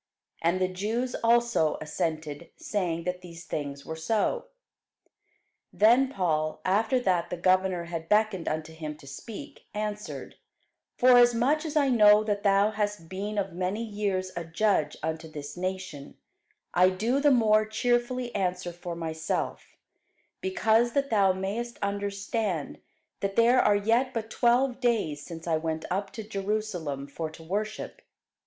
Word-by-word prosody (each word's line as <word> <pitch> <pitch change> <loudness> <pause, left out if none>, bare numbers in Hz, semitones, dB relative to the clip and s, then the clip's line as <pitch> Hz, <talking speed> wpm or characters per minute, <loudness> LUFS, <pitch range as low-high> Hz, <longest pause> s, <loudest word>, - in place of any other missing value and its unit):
And 170 +3 +2
the 185 - +2
Jews 220 +7 -2
also 235 -8 +3
assented, 155 0 -3
saying 175 -5 -2
that 180 +1 -3
these 170 -1 -11
things 140 -2 -5
were 160 - -5
so. 215 - 0 1.3
Then 240 +5 +5
Paul, 155 - 0
after 220 +7 +2
that 175 -6 +1
the 180 - -4
governor 185 0 +2
had 165 -1 -6
beckoned 210 -4 +2
unto 155 +1 -3
him 155 -2 -6
to 150 - -16
speak, 230 - -9
answered, 210 +1 -5 0.6
Forasmuch 245 +4 +5
as 315 -1 -4
I 285 -3 +4
know 210 -3 +6
that 205 -1 -1
thou 200 +1 +4
hast 205 -5 -3
been 205 +3 -4
of 195 -3 -1
many 185 +5 -2
years 200 -4 -2
a 170 - -3
judge 165 -2 +1
unto 160 0 -3
this 145 -1 -7
nation, 185 -6 -5 0.6
I 180 +1 +5
do 225 +8 0
the 290 +1 +4
more 220 -5 +4
cheerfully 240 +2 0
answer 180 -1 -2
for 175 0 -6
myself: 160 -1 -3 0.7
because 240 -11 +2
that 280 -2 0
thou 200 -3 +4
mayest 205 +6 -3
understand, 200 -3 -2 0.4
that 195 0 -2
there 240 +2 +5
are 205 - +4
yet 230 +6 +1
but 225 -1 -3
twelve 245 +1 +2
days 215 - 0
since 165 -2 -8
I 165 -2 +1
went 160 0 -3
up 195 +2 -1
to 220 - -6
Jerusalem 195 -9 -3
for 155 +3 -5
to 160 +1 -13
worship. 210 +6 -4
200 Hz, 145 wpm, -28 LUFS, 170-225 Hz, 1.3 s, know